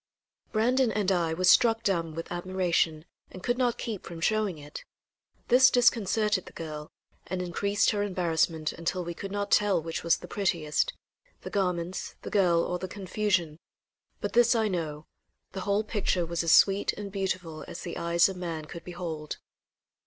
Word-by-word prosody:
Brandon 245 +2 +2
and 200 -2 0
I 170 -3 +1
were 185 - -3
struck 225 +4 +5
dumb 165 -6 0
with 165 - -6
admiration 175 -3 0 0.2
and 185 - -11
could 245 +1 0
not 245 -2 +1
keep 215 -5 -5
from 170 -1 -8
showing 210 -1 +1
it. 145 0 -9 0.7
This 255 +2 +7
disconcerted 215 -4 +2
the - - -11
girl, 155 -2 -7 0.4
and 185 +1 -3
increased 200 +3 +1
her 205 -2 -1
embarrassment 165 -5 0
until 175 +2 -2
we 170 0 -5
could 195 +3 -7
not 205 0 -3
tell 205 -4 +4
which 165 0 -4
was 170 0 +3
the - - -10
prettiest 165 -7 0 0.5
the - - -7
garments, 180 -2 -2
the - - -6
girl 175 -5 +3
or 180 - -2
the 185 - -4
confusion; 185 -4 -1 0.6
but - - -3
this 240 0 +5
I 220 -1 +2
know, 155 -5 -3 0.5
the 190 - -5
whole 200 +2 +1
picture 200 -5 0
was 170 +1 -2
as 165 - +2
sweet 200 0 +5
and 200 -1 -7
beautiful 185 -5 -3
as - - -7
the 170 - -6
eyes 170 0 +3
of 190 - -5
man 165 -3 -4
could 165 +2 -9
behold. 170 -4 -5
185 Hz, 175 wpm, -28 LUFS, 170-205 Hz, 0.7 s, This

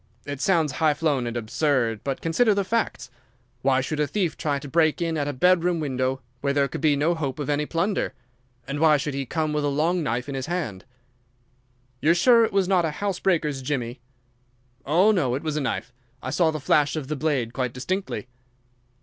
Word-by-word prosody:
It 145 -1 -5
sounds 165 -6 +2
high 155 0 +2
flown 145 -6 0
and 120 0 -3
absurd, 120 -1 0
but 135 -1 -3
consider 205 +7 +2
the 200 - +1
facts! 225 - -2 0.5
Why 135 0 +3
should 150 +3 -3
a 150 - +2
thief 185 -4 -1
try 145 -3 -1
to 140 - -8
break 155 +1 +2
in 165 -1 -1
at 145 -2 -1
a - - 0
bedroom 180 +4 +2
window, 130 -2 -1 0.2
where 140 +1 0
there 140 -1 +2
could - - -6
be 155 -3 +4
no 150 +5 +2
hope 140 -6 -3
of 145 -1 -2
any 145 +1 0
plunder, 185 +5 -1 0.5
and 140 +2 -3
why 155 -1 +5
should 145 +1 -3
he 135 -1 -3
come 155 +1 -1
with 150 -1 0
a - - +1
long 160 +5 +1
knife 125 -3 -2
in 140 - -4
his 135 +1 -4
hand?" 150 - -3 1.2
"You 150 - +2
are 170 - +6
sure 230 +6 +6
it 225 - +1
was 195 -2 +2
not 185 -2 +3
a 160 - +1
house 200 -2 -2
breaker's 155 -7 0
jimmy?" 125 -2 -3 0.9
"Oh, 180 +9 +5
no, 140 - +1
it 135 - -4
was 155 -2 -2
a 150 - 0
knife. 130 -2 -3 0.3
I 130 - -3
saw 160 +3 +3
the 155 -1 -3
flash 145 +1 +2
of 150 -4 -4
the 155 - -2
blade 135 -5 -1
quite 125 -2 -1
distinctly." 130 - -3
150 Hz, 215 wpm, -24 LUFS, 135-170 Hz, 1.2 s, are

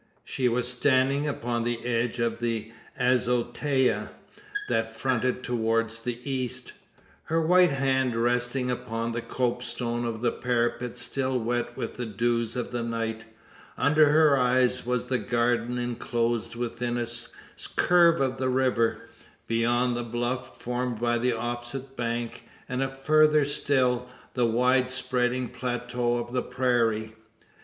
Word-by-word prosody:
She 125 -2 0
was 120 +1 0
standing 130 +3 +2
upon 120 -4 -2
the 120 0 -2
edge 120 0 0
of 115 -1 -1
the 115 -2 -2 0.3
azotea 125 +2 +1 0.6
that 115 0 -1
fronted 125 +1 0
towards 115 -1 0
the 120 0 -3
east; 130 -3 -3 0.5
her 165 +1 +1
white 180 +2 +5
hand 130 -3 +1
resting 120 +2 0
upon 115 -1 -3
the 120 0 -3
copestone 120 -1 -2
of 115 -1 -3
the 120 -1 +2
parapet 120 0 -1
still 130 -1 0
wet 120 0 -2
with - - -4
the 120 -1 -3
dews 115 +1 0
of 125 -2 -3
the 120 -1 -2
night, 115 -1 -3 0.5
under 150 0 +4
her 150 -2 +5
eyes 125 0 +2
was 125 -1 0
the 130 -1 0
garden, 120 0 0
enclosed 120 -1 -1
within 120 0 -2
a 120 - 0 0.7
curve 170 -1 +5
of 130 -1 0
the 130 -1 +1
river; 125 -3 +1 0.4
beyond 120 +2 +1
the 120 - -2
bluff 120 +2 -3
formed 125 -1 -2
by 120 0 +1
the 125 +1 +1
opposite 120 +3 -4
bank; 120 -1 -3 0.2
and 125 +1 -2
further 150 +2 +4
still, 125 -3 +1 0.2
the 125 -2 +2
wide 125 +2 +3
spreading 125 -1 0
plateau 120 0 -2
of 120 0 -5
the 125 - +1
prairie. 115 -4 0
120 Hz, 135 wpm, -27 LUFS, 120-130 Hz, 0.7 s, white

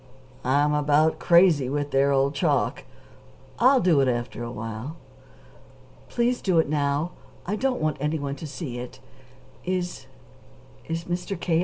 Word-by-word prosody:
"I'm 145 +3 +2
about 150 +2 +2
crazy 170 -7 +4
with 145 +1 -2
their 135 +1 +3
old 135 +1 +2
chalk. 135 - 0 0.7
I'll 260 +2 +6
do 175 -9 +3
it 135 - +2
after 120 -1 -2
a 120 - -4
while." 115 +7 -6 1.1
"Please 245 +1 0
do 185 -4 +1
it 160 - +4
now. 145 +2 0 0.3
I 200 - -1
don't 260 +3 0
want 155 -1 0
anyone 145 -1 -2
to 155 - -7
see 140 -4 -6
it. 125 0 -8 0.6
Is 180 -1 -3 0.8
is 165 +1 -3
Mr. 175 +2 -4
K. 165 -2 +1
150 Hz, 145 wpm, -25 LUFS, 140-175 Hz, 1.1 s, I'll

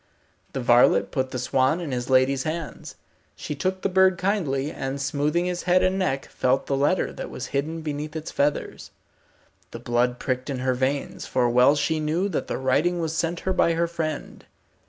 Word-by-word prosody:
The 135 - -2
varlet 120 0 +4
put 130 -1 -1
the 130 - -4
swan 130 +5 +1
in 165 -5 -5
his 125 0 -3
lady's 130 +1 +3
hands. 160 +2 -5 0.4
She - - -5
took 185 +6 -2
the - - +3
bird 190 -1 +4
kindly, 155 -8 -1
and 135 -1 -4
smoothing 145 +5 0
his 180 0 -2
head 180 +1 +5
and 185 +1 +1
neck, 135 -8 -1
felt 130 +1 0
the 140 - 0
letter 145 +7 +1
that - - -6
was 125 - -6
hidden 155 +4 -2
beneath 150 0 -5
its 160 -1 -5
feathers. 145 +1 -1 0.8
The - - -8
blood 120 +1 0
pricked 130 +1 -3
in 135 - -2
her 130 0 0
veins, 135 +2 -2
for 125 -1 +1
well 125 +4 +5
she 155 +2 0
knew 160 +5 0
that 175 - -2
the - - -2
writing 150 +7 +1
was 165 -1 -2
sent 165 +1 -1
her 190 - -1
by 170 -2 +3
her 170 +1 +1
friend. 160 -3 -5
145 Hz, 195 wpm, -24 LUFS, 130-170 Hz, 0.8 s, head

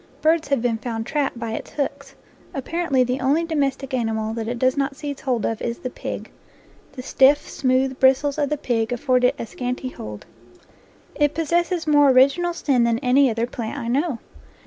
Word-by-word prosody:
Birds 320 +1 +3
have 275 -4 0
been 230 -2 0
found 225 -1 -4
trapped 285 -3 -1
by 230 -1 -4
its 225 - -5
hooks. 275 -1 -4 0.4
Apparently 275 -1 0
the 250 +2 -2
only 290 +6 +2
domestic 275 -4 -2
animal 220 -3 -1
that 225 -1 -4
it 240 +1 -3
does 255 +2 +2
not 275 0 -1
seize 285 -1 -6
hold 250 -4 -1
of 225 - -2
is 235 0 -3
the 255 - -6
pig; - - -6 0.6
the 255 -2 -8
stiff, 275 +3 +4
smooth 260 0 0
bristles 270 +2 +3
of 290 -2 +1
the 300 - -1
pig 230 -5 -1
afford 250 +1 +1
it 250 - +3
a - - -4
scant 250 +2 -4
hold. 105 -1 -8 0.9
It 295 -1 +1
possesses 340 +2 0
more 290 -2 +5
original 275 +7 +4
sin 260 -7 +2
than 235 -1 +2
any 260 +2 +4
other 230 0 -1
plant 235 -2 -5
I 230 - -4
know. 280 +1 0
265 Hz, 190 wpm, -22 LUFS, 240-290 Hz, 0.9 s, more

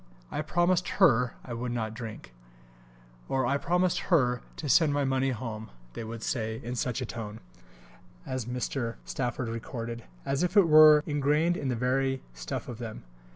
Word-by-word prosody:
"I - - -1
promised 175 +3 +1
Her 125 - +4
I 125 - -6
would 120 +1 -3
not 110 -2 -2
drink," 110 - -8 1.0
or 130 -1 +1
"I 140 +3 +2
promised 180 +3 +1
Her 125 -8 +3
to 150 - -5
send 155 +2 +4
my 145 -1 +1
money 135 0 +1
home," 110 -3 -5 0.2
they - - -5
would 115 0 -7
say, 110 -2 -2
"in 120 - -4
such 125 +1 -1
a - - -1
tone," 110 -2 -6 0.9
as 130 -3 -3
Mr. 125 -1 -3
Stafford 125 -2 -2
recorded, 115 -1 -5 0.2
"as 135 +1 0
if 180 +4 +1
it 195 -4 +7
were 155 -1 +8
ingrained 150 +3 +2
in 140 - -3
the 125 - 0
very 130 +2 0
stuff - - -5
of 120 -2 -7
them." 110 - -7
125 Hz, 170 wpm, -29 LUFS, 115-150 Hz, 1.0 s, were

